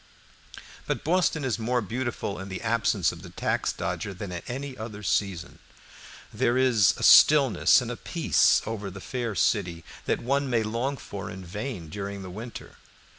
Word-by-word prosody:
But - - -2
Boston 165 -3 +1
is 125 -3 -1
more 120 +2 0
beautiful 115 -3 -3
in 95 +1 -7
the 95 +3 -6
absence 110 -5 +1
of - - -11
the - - -10
"tax - - -1
dodger" 100 - -4
than 100 -1 -6
at 85 -1 -7
any 135 +2 -5
other 110 -2 -8
season. 90 -4 -1 0.7
There 120 +2 +1
is 125 -6 +4
a - - -5
stillness 140 -6 +7
and - - -4
a - - -4
peace - - +2
over 105 -2 -4
the 100 +1 -9
fair 120 0 -4
city 85 -6 0 0.2
that - - 0
one 140 +2 0
may 115 -3 +2
long 120 +6 -2
for 100 -5 -7
in 95 0 -8
vain 105 -1 -5
during 100 +1 -5
the 90 - -8
winter. 115 +5 -9
110 Hz, 175 wpm, -26 LUFS, 100-125 Hz, 0.7 s, stillness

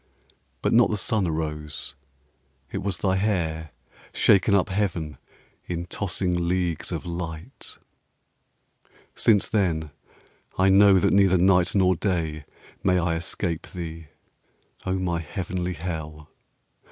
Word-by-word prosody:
But - - +2
not 120 +1 +6
the 105 - -1
sun 105 -1 +1
arose: 75 -2 -4 0.8
it - - -3
was 95 -3 -2
thy 95 +2 +1
hair 85 -6 -1 0.4
Shaken 100 +1 +4
up 100 +1 +2
heaven 90 -6 -2 0.5
in 85 0 -3
tossing 90 -2 -1
leagues 90 -2 -1
of - - -4
light. 85 - -6 1.4
Since 105 -4 +3
then 80 -8 0 0.7
I 95 +1 +4
know 100 0 +7
that 90 - +3
neither 95 -2 +5
night 90 0 +3
nor 95 -2 +4
day 80 -5 -2 0.4
May 90 -1 +3
I 85 -1 +1
escape 85 0 -3
thee, 80 -2 -7 0.8
O 95 0 +1
my 85 -2 -1
heavenly 90 +1 -3
hell! 80 -2 -6
90 Hz, 120 wpm, -25 LUFS, 80-95 Hz, 1.4 s, know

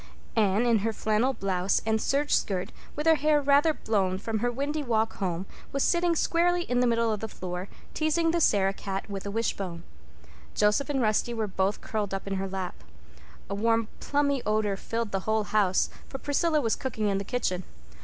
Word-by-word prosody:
Anne, 210 +1 +3
in 230 -2 +4
her 225 +3 0
flannel 220 +4 +1
blouse 195 -5 0
and 220 0 +1
serge 290 +2 +1
skirt, 185 -3 0 0.2
with 300 - -3
her 325 - +7
hair 305 -1 +3
rather 285 +2 +4
blown 195 -9 0
from 220 +2 -2
her 245 +2 0
windy 285 +5 -2
walk 225 -4 0
home, 185 -2 -2 0.3
was 275 - 0
sitting 345 -1 +2
squarely 350 +2 +2
in 245 -6 0
the 250 - +3
middle 230 -1 +2
of 210 - -3
the 220 - -4
floor, 180 -2 -5 0.3
teasing 325 +1 +1
the 340 0 +1
Sarah 195 -7 +3
cat 195 0 -4
with 195 0 -5
a - - -2
wishbone. 200 -5 -2 0.7
Joseph 210 +8 +2
and 270 -4 +1
Rusty 220 +2 +1
were 220 -1 0
both 195 0 -1
curled 205 -3 -2
up 195 - -5
in 195 -1 -2
her 195 0 -2
lap. 185 - -5 0.6
A - - -4
warm 225 +2 +1
plummy 280 -2 +1
odor 210 -1 +1
filled 230 +2 -3
the 195 - 0
whole 220 0 +2
house, 205 -3 +2 0.2
for 270 - -5
Priscilla 300 +3 +1
was 225 -4 +1
cooking 220 -5 -2
in 195 -1 +1
the - - -3
kitchen. 200 -5 -1
220 Hz, 195 wpm, -28 LUFS, 195-275 Hz, 0.7 s, her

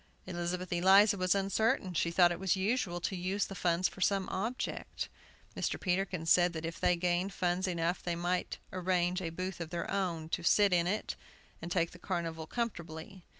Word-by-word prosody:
Elizabeth 180 0 -3
Eliza 195 +4 +6
was 185 0 +2
uncertain. 195 -1 +1
She 170 0 +1
thought 175 0 +5
it 175 - -3
was 190 -1 +2
usual 190 -2 0
to 190 - -2
use 185 +3 -1
the - - -7
funds 180 -1 +1
for 190 - -11
some 195 0 +2
object. 225 +7 -3 0.5
Mr. - - -1
Peterkin 180 -2 -1
said 175 +1 +5
that 160 0 -4
if 165 0 -5
they 180 - +3
gained 175 +2 0
funds 180 +1 0
enough 170 0 -1
they 175 -1 -2
might 175 +1 -1 0.2
arrange 180 0 +1
a 170 - -2
booth 185 +3 -4
of 165 - -4
their 170 0 -3
own, 170 -5 -2
and - - -3
sit 205 -2 +5
in 175 -1 +3
it, 210 +4 -2 0.5
and 175 - -6
take 170 0 +1
the 180 - -13
carnival 165 -3 -3
comfortably. 175 -5 -5
180 Hz, 190 wpm, -32 LUFS, 170-190 Hz, 0.5 s, Eliza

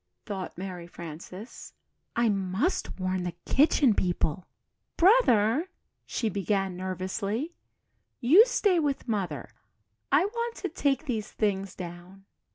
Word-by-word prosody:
thought 195 -5 -5
Mary 180 -2 -6
Frances, 175 +6 -9 0.4
"I 235 0 +3
must 195 - 0
warn 185 0 -1
the 175 -2 -4
Kitchen 275 -3 +4
People." 175 -2 -1 0.5
"Brother," 330 - +4 0.4
she 230 - -1
began, 195 -2 0
nervously, 190 - -3 0.7
"you 335 - +7
stay 410 -7 +2
with 280 -4 -1
Mother 190 -10 -2 0.6
I 295 +6 +5
want 470 +2 -3
to - - -4
take 280 +1 0
these 225 -6 -3
things 195 -2 -1
down." 180 +2 -9
205 Hz, 115 wpm, -28 LUFS, 185-280 Hz, 0.7 s, you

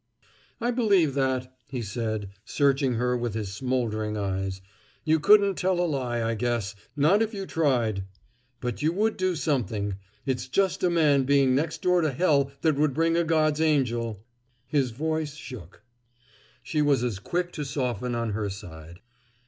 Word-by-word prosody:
"I 240 +1 0
believe 200 - +3
that," 130 -1 -1
he 125 -3 -4
said, 110 -1 -3
searching 135 0 +1
her 125 +1 +1
with 120 -3 -2
his 105 -3 -3
smoldering 110 -3 -1
eyes. 95 -1 -2 0.5
"You 160 0 +3
couldn't 200 +2 +5
tell 185 -1 +1
a 175 - +2
lie, 125 -7 -1
I 115 - 0
guess, 115 -3 -1 0.2
not 155 +9 +4
if 225 0 -1
you 195 -1 -4
tried! 120 - 0 0.6
But 125 0 -3
you 155 +2 +2
would 215 +4 +1
do 185 -1 0
something; 110 - -1 0.3
it's 130 -2 -2
just 190 +8 +1
a 180 - +4
man 150 -5 +3
being 135 -1 +4
next 150 +4 -1
door 180 -1 +3
to 155 -3 +1
hell 140 -2 +2
that 155 -3 +2
would 145 -2 +2
bring 165 +1 +2
a 170 - +3
God's 155 -2 +2
angel 120 -8 0 0.2
" 125 -1 -42
His 135 -3 +3
voice 155 +4 -2
shook. 115 - -10 0.8
She 155 - -1
was 145 -4 +3
as 115 -6 -2
quick 175 - -2
to 150 - -4
soften 125 -3 -2
on 115 -2 -1
her 105 0 -2
side. 85 -2 -10
135 Hz, 170 wpm, -26 LUFS, 115-160 Hz, 0.8 s, couldn't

